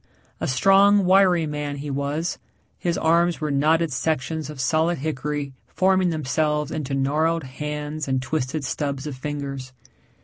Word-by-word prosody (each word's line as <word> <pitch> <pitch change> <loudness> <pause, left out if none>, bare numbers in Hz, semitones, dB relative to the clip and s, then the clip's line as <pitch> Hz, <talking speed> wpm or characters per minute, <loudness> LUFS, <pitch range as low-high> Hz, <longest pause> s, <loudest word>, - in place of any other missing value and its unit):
A - - -2
strong, 195 +7 +5
wiry 185 -3 +4
man 150 -1 -3
he 145 0 -5
was 145 +5 -2 0.4
his 175 0 -1
arms 170 0 +2
were 155 -2 -2
knotted 155 +2 +2
sections 155 +2 -2
of 150 -3 -8
solid 160 +6 +1
hickory 145 -1 -3
forming 185 -1 +2
themselves 150 0 0
into 140 -3 -3
gnarled 155 +4 +1
hands 150 +3 -5
and 130 -1 +1
twisted 140 +2 -2
stubs 140 +1 -3
of 150 -3 -5
fingers. 140 -1 -5
150 Hz, 140 wpm, -23 LUFS, 140-165 Hz, 0.4 s, strong